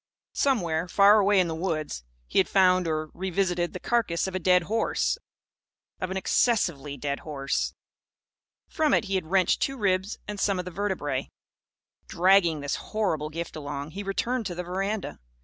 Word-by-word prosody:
Somewhere, 175 - +1
far 200 +3 +6
away 200 -1 +4
in 180 - +3
the 165 - -3
woods, 160 - -3 0.2
he - - +1
had 190 - +2
found, 185 -2 +4
or 155 -1 -2
revisited, 180 -1 -1
the 185 - -5
carcase 225 -8 0
of 190 - -4
a 185 - -1
dead 180 0 +4
horse 220 +6 0 0.8
of 185 - -3
an 190 - -3
excessively 175 - +1
dead 140 +1 -3
horse. 140 -3 -2 0.9
From 310 -3 +2
it - - +2
he 195 - -4
had 185 -4 -1
wrenched 185 +1 +2
two 270 0 -1
ribs 195 -1 0
and 210 -1 -5
some 195 -1 +1
of 180 - -3
the 180 - -6
vertebræ. 170 -8 -2 0.8
Dragging 175 -4 +3
this 145 0 -2
horrible 175 -9 -2
gift 165 +2 -6
along, 145 0 -5
he 195 - -6
returned 220 +4 -1
to 175 - -5
the 180 - -4
veranda. 195 +3 -3
185 Hz, 170 wpm, -27 LUFS, 160-200 Hz, 0.9 s, far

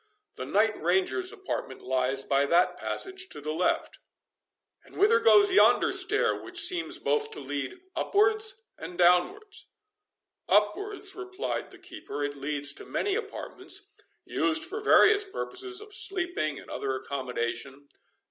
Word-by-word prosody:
The - - -7
Knight 215 +2 +1
Ranger's 190 - +1
apartment 435 +4 -6
lies 130 +1 0
by 140 +1 +1
that 175 +4 +3
passage 380 -1 -2
to - - -5
the 150 +1 -4
left." 175 +3 -1 0.8
"And - - -16
whither 430 +4 +5
goes 410 -3 +5
yonder 375 - +5
stair, 385 +2 +1
which - - -5
seems 355 -2 +1
both 440 -1 0
to 445 - -6
lead 140 -2 -5 0.2
upwards 430 +2 +1 0.2
and 175 - -8
downwards?" 275 - +2 0.8
"Upwards," 390 - +1
replied 375 +2 -5
the - - -14
keeper, 145 - -7
"it 145 0 -3
leads 140 0 -2
to - - -6
many 405 - -1
apartments, 400 -2 -3 0.3
used 315 0 +2
for 410 +6 -5
various 425 0 +6
purposes, 380 -1 -4
of 420 0 -10
sleeping, 360 - +1
and - - -12
other 135 -1 -3
accommodation. 130 +1 -4
370 Hz, 140 wpm, -28 LUFS, -, 0.8 s, various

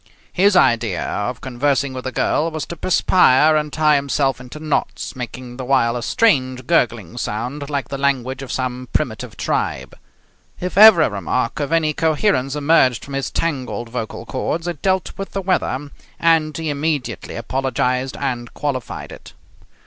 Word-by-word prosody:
His 195 +2 +4
idea 115 - +2
of 120 +4 -3
conversing 135 +1 0
with 130 0 -5
a - - -3
girl 160 +4 +1
was 155 -3 -4
to 170 - -7
perspire 155 -4 +4
and 150 -1 0
tie 150 0 +3
himself 140 -2 0
into 125 +4 -10
knots, 155 -2 -2
making 125 0 -7
the 130 - -5
while 125 -2 +2
a 120 - -3
strange 130 - +1
gurgling 120 - 0
sound 125 +8 -4
like 140 -4 -2
the 140 - -4
language 135 -2 0
of 135 - -7
some 125 -1 -3
primitive - - -2
tribe. 65 0 -2 0.6
If 180 +1 -4
ever 205 -5 +9
a - - +2
remark 105 - -2
of 145 0 -2
any 160 -2 +2
coherence 155 -3 +1
emerged 145 -5 +3
from 140 - -9
his 135 0 -2
tangled 125 -8 -3
vocal 115 -1 -5
cords 160 +7 -3
it 170 -5 -4
dealt 190 -1 0
with 195 - -6
the 195 - -2
weather, 145 -6 -1 0.3
and 160 -2 +2
he 160 -2 -2
immediately 145 -2 -3
apologized 130 +1 -1
and 125 -4 -3
qualified 135 -5 -4
it. - - -12
135 Hz, 165 wpm, -20 LUFS, 125-155 Hz, 0.6 s, ever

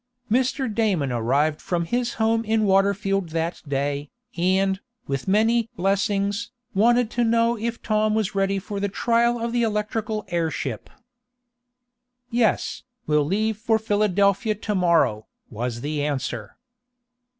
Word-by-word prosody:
Mr. 260 +3 +1
Damon 195 - +1
arrived 135 +6 +1
from 170 -2 -1
his 240 +5 -1
home 225 0 +1
in 220 0 +1
Waterfield 195 -1 +2
that 165 +1 -2
day, 140 +1 -1 0.3
and, 190 +2 +1 0.3
with 135 +3 -3
many 225 +3 +3
"blessings," 200 +3 0 0.2
wanted 235 +3 +3
to 240 - +1
know 230 +1 +3
if 235 +1 -4
Tom 215 -1 +1
was 215 0 0
ready 195 0 +1
for 200 +1 -5
the 200 0 -1
trial 235 +3 +2
of 230 0 -2
the 240 - +2
electrical 215 -1 -1
airship. 170 -2 -2 1.4
"Yes, 230 -2 +1 0.2
we'll 150 -1 +2
leave 215 +6 0
for 220 0 +2
Philadelphia 205 0 +1
to 210 0 -3
morrow," 165 - +2 0.2
was 120 +1 -4
the 150 +1 -2
answer. 130 -7 -3
200 Hz, 130 wpm, -24 LUFS, 165-225 Hz, 1.4 s, many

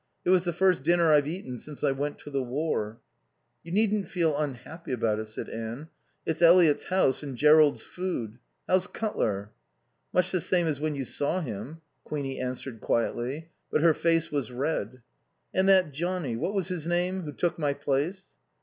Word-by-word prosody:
It 180 - +3
was 185 -1 +4
the 175 - +1
first 180 -2 +2
dinner 170 +2 +3
I've 145 -1 +5
eaten 150 -7 -5
since 150 +3 -9
I 145 - +3
went 145 +2 -3
to 145 - -10
the 140 -1 0
war." 125 -4 -2 0.6
"You 170 - -10
needn't 210 0 +2
feel 165 -5 +1
unhappy 150 +2 -5
about 115 -3 0
it," 110 - -5
said 110 - -6
Anne. 115 +7 -6 0.4
"It's 160 +1 -2
Eliot's 170 -3 +6
house 185 -8 +2
and 140 -4 -6
Jerrold's 150 +1 +5
food. 125 - -4 0.3
How's 185 0 +3
Cutler?" 105 - -2 0.6
"Much 180 - +2
the 185 - 0
same 175 0 +1
as 150 -4 -1
when 155 -1 -1
you 135 -2 -3
saw 145 +9 -1
him." 130 - -6 0.2
Queenie 140 -3 -4
answered 125 -2 -5
quietly, 125 +7 -1 0.2
but - - +1
her 165 0 +6
face 165 0 +1
was 140 -5 -2
red. 130 -1 -3 0.5
"And 190 +1 +3
that 185 -5 +5
Johnnie 170 -4 -2
what 190 - -2
was 190 -1 -1
his 170 -3 -3
name? 180 +2 0
who 155 -4 -6
took 170 +3 -1
my 145 -2 0
place?" 145 +7 -2
150 Hz, 180 wpm, -28 LUFS, 130-175 Hz, 0.6 s, Eliot's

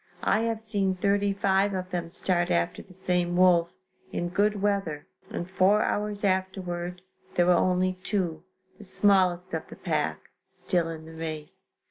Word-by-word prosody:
I - - +3
have 225 -1 -1
seen 200 -4 0
thirty 200 +2 +2
five 195 0 +2
of 185 0 -4
them 175 -2 -3
start 175 0 0
after 85 0 0
the 190 - -17
same 180 -1 0
wolf, 175 -2 +5 0.4
in 175 - -2
good 205 +3 +1
weather 195 -7 -1 0.2
and 175 - -4
four 190 +3 +3
hours 210 0 -2
afterward 180 -2 -1 0.3
there 175 - +4
were 180 - +5
only 185 +1 +2
two, 175 -6 -2 0.4
the - - -10
smallest 185 -2 +3
of - - -3
the - - -10
pack, - - -1 0.2
still 175 -3 0
in 160 -1 -7
the 160 - -11
race. 160 -2 -7
185 Hz, 160 wpm, -27 LUFS, 175-200 Hz, 0.4 s, wolf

